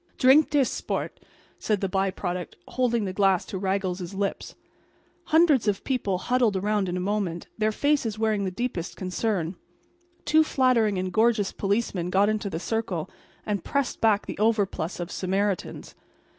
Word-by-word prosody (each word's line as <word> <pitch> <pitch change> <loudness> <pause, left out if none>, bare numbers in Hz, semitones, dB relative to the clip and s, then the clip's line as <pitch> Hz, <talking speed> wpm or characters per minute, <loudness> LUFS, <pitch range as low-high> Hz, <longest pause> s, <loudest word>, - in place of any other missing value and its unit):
"Drink 275 +4 +6
dis, 285 -4 +3
sport," - - -4 0.4
said 210 -2 0
the 195 - -1
by 190 +1 0
product, 180 -1 -4
holding 235 -4 0
the 185 - -3
glass 195 -2 +2
to 190 - -5
Raggles's 190 -1 -2
lips. 200 0 -3 0.7
Hundreds 310 -8 +4
of 200 -2 0
people 220 -8 -1
huddled 240 +1 +1
around 205 0 0
in 175 - -2
a - - -1
moment, 185 -3 -2
their 215 0 +2
faces 260 -3 0
wearing 215 -2 +1
the 190 - -1
deepest 185 -4 -4
concern. 185 -2 -2 0.7
Two 315 +1 +5
flattering 250 -8 +2
and 185 0 -3
gorgeous 220 -2 +2
policemen 200 -3 -1
got 195 +3 +3
into 215 -1 -1
the 165 -3 -4
circle 190 -5 -3 0.3
and 205 -4 -2
pressed 280 -2 -2
back 215 -2 +3
the - - -7
overplus 205 -6 0
of 175 +1 -5
Samaritans. 195 0 -2
205 Hz, 155 wpm, -26 LUFS, 185-230 Hz, 0.7 s, Drink